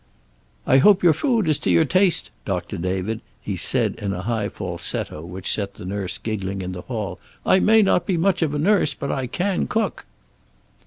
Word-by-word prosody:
"I 130 - +5
hope 195 +6 +5
your 170 -3 +6
food 230 - +1
is 155 -2 +2
to - - -2
your 85 -2 +4
taste, 185 -1 +2
Doctor - - -3
David," 95 +5 -2 0.2
he - - -4
said, - - +2
in 100 -1 -2
a 90 0 -5
high 110 -2 -1
falsetto 85 -3 -4
which 90 +2 -3
set 100 -2 -3
the - - -10
nurse 95 -1 -3
giggling 100 -3 -4
in 90 - -4
the 90 -1 -6
hall. 110 -4 -5 0.3
"I 190 - +5
may 220 +2 +5
not 185 -2 +2
be 185 -4 +1
much 180 +1 +1
of 150 -3 0
a - - 0
nurse, 160 -3 +2
but 140 - -4
I 130 -2 -2
can 185 +8 -1
cook." 225 - -2
120 Hz, 200 wpm, -22 LUFS, -, 0.3 s, your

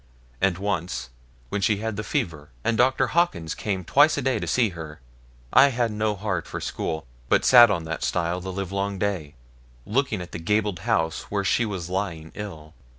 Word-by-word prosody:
And 95 -3 +2
once, 90 -9 -3 0.4
when 105 - -2
she 105 +1 +2
had 110 +1 -3
the 105 - -3
fever, 85 - -3
and 115 - +1
Dr. 125 +3 +3
Hawkins 105 - +1
came 95 -3 -3
twice 145 +2 +5
a 140 - -1
day 130 -4 +1
to - - -4
see 120 -4 +2
her, 80 -4 -9 0.5
I 140 - +8
had 120 -4 0
no 105 0 0
heart 95 -4 -3
for - - -5
school, 80 -1 -3 0.2
but - - +3
sat 120 -2 +9
on 85 -5 0
that 80 0 -4
stile 90 +1 -1
the 95 +1 -5
livelong 100 +1 -3
day, 90 -7 -2 0.5
looking 120 -2 0
at 90 -1 -8
the - - -5
gabled 105 +1 0
house 80 -7 -1
where 100 -1 -1
she 115 +4 +2
was 95 -5 -4
lying 90 -4 -3
ill. 80 -7 -8
100 Hz, 190 wpm, -25 LUFS, 85-110 Hz, 0.5 s, sat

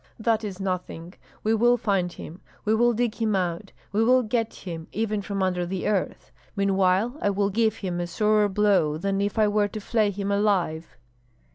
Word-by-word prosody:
"That 225 0 0
is 200 -3 -5
nothing! 180 -2 -4 0.3
We 220 - +2
will 240 +2 +4
find 195 -5 0
him! 170 +1 -10 0.2
We 215 - +2
will 240 +2 +4
dig 235 -1 0
him 215 -2 +1
out! 180 +1 -2 0.2
We 210 +3 +2
will 255 +2 +4
get 225 0 -1
him, 165 -4 -8
even 215 -1 -1
from 195 -1 -3
under 180 -1 0
the 180 +1 -4
earth! 200 -3 -2 0.2
Meanwhile 195 +3 +2
I 205 - +2
will 200 0 0
give 220 +1 +1
him 180 -5 -4
a 175 - -2
sorer 210 +3 +2
blow 190 -7 +2
than 195 +3 -1
if 205 +2 -2
I 215 -1 +4
were 205 0 +2
to 215 - -7
flay 215 0 +1
him 200 0 -3
alive." 180 -9 0
200 Hz, 190 wpm, -25 LUFS, 185-215 Hz, 0.3 s, will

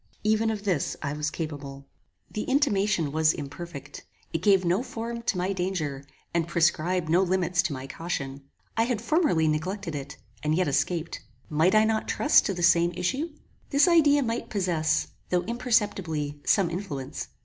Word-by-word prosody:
Even 220 +1 +2
of 215 -2 -3
this 185 -8 0
I 140 -1 -2
was 150 0 -1
capable! 145 -4 -6 0.5
The 210 - -3
intimation 205 - +1
was 155 +1 +3
imperfect: 170 +4 -8 0.3
it - - -1
gave 195 -3 +4
no 180 +6 +2
form 235 -2 -5
to 225 -4 -1
my 185 +2 0
danger, 170 -7 -3 0.3
and 170 -1 +1
prescribed 170 +1 +1
no 170 +4 +4
limits 180 -1 +1
to 175 -4 -2
my 130 0 -6
caution. 140 -3 -4 0.3
I 225 - +3
had 240 -3 -1
formerly 235 - +2
neglected 165 +4 -2
it, 140 -1 -6 0.2
and 155 +1 +1
yet 185 0 +1
escaped. 155 +4 -1 0.3
Might 160 +6 +3
I 215 - +6
not 220 0 0
trust 295 - +4
to 195 - -1
the 175 - -3
same 170 0 +5
issue? 265 - -1 0.4
This 280 +4 +4
idea 295 -5 +5
might 230 0 -3
possess, 170 -6 0 0.2
though 180 -1 +1
imperceptibly, 200 - -1
some 185 -4 +3
influence. 150 -7 -5
180 Hz, 165 wpm, -27 LUFS, 155-215 Hz, 0.5 s, I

